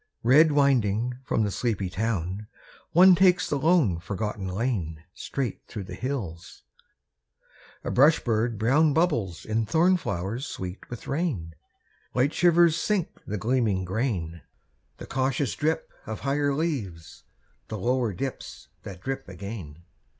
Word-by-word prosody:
Red 150 +6 +6
winding 125 -4 +2
from 110 - 0
the 105 - 0
sleepy 105 -3 -1
town, 100 0 -2 0.4
One 180 +3 +8
takes 180 0 +4
the 145 - -1
lone, 145 - +3
forgotten 100 +2 -4
lane 90 -6 -2
Straight 135 -3 -4
through 105 -4 -6
the - - -9
hills. 110 - -5 1.2
A - - -3
brush 145 +5 +5
bird 115 -1 0
brown 140 +8 +3
Bubbles 120 - 0
in 110 0 -1
thorn 175 - +4
flowers 110 - -3
sweet 90 +1 -7
with 120 - -8
rain; 135 - -2 0.6
Light 130 +4 +2
shivers 170 -2 +5
sink 200 -2 0 0.2
the 105 - -2
gleaming 110 -3 +1
grain; 90 - -2 0.6
The - - -8
cautious 135 0 -1
drip 160 +1 -1 0.2
of 110 - -5
higher 140 +1 +1
leaves 120 - -4 0.4
The 110 - -5
lower 120 +2 0
dips 130 +8 -6
that 95 -3 -9
drip 135 0 -4
again. 90 -7 -8
120 Hz, 135 wpm, -26 LUFS, 95-145 Hz, 1.2 s, One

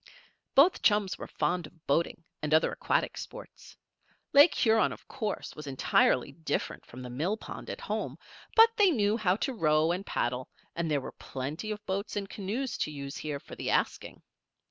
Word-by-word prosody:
Both 305 +7 +6
chums 205 -3 +2
were - - -6
fond 175 -3 -1
of 165 0 -23
boating 165 +3 0 0.2
and 150 +1 +2
other 160 - +3
aquatic - - 0
sports. - - -10 0.6
Lake 290 +4 +8
Huron, 220 -1 +3
of - - -10
course, 215 -6 -4
was 150 -1 -8
entirely 135 -1 +2
different 80 - -3
from 130 +1 -9
the 125 - -7
millpond 175 - -3
at - - -5
home; - - -3 0.4
but 455 +1 +7
they 410 -3 +6
knew 210 - +2
how 195 -5 +2
to 265 +5 -2
row 155 -5 +3
and 180 +3 -2
paddle, 125 -7 -2 0.3
and 170 -1 -1
there 145 -2 +1
were - - -7
plenty 145 +10 -5
of 210 -1 -5
boats 195 +3 -3
and 200 -1 -2
canoes 215 +7 -3
to - - 0
use 140 -2 -6
here, 150 -2 -4
for - - -13
the - - -4
asking. - - -1
180 Hz, 180 wpm, -30 LUFS, 150-215 Hz, 0.6 s, Lake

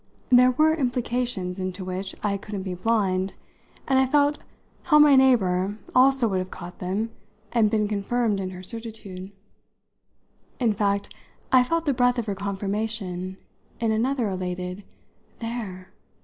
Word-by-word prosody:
There 250 0 +7
were 310 +5 +3
implications 245 - -1
in 185 - -1
it 185 - -5
to 185 -1 -6
which 185 +1 -3
I 205 -1 +1
couldn't 200 -1 -6
be 185 -1 -4
blind, 190 -1 0 0.5
and 265 -1 +4
I 265 - +3
felt 290 +2 +2 0.5
how 300 -4 +5
my 295 -2 +7
neighbour 205 -7 +3 0.2
also 260 -1 +5
would 190 -3 0
have 185 0 -4
caught 175 -1 -9
them 200 +5 -2 0.4
and 225 -3 +3
been 210 -1 +1
confirmed 210 +1 0
in 190 -1 -3
her 185 0 -9
certitude. 205 -3 -6 1.3
In 235 -4 +2
fact 200 0 -1 0.4
I 255 - +7
felt 330 +6 0
the 285 - +2
breath 245 0 +2
of 235 - -1
her 205 - -2
confirmation 195 -1 -3 0.4
in 225 -1 +1
another 240 +2 +1
elated 180 0 -4 0.5
"There!" 215 -6 -6
210 Hz, 150 wpm, -25 LUFS, 185-245 Hz, 1.3 s, There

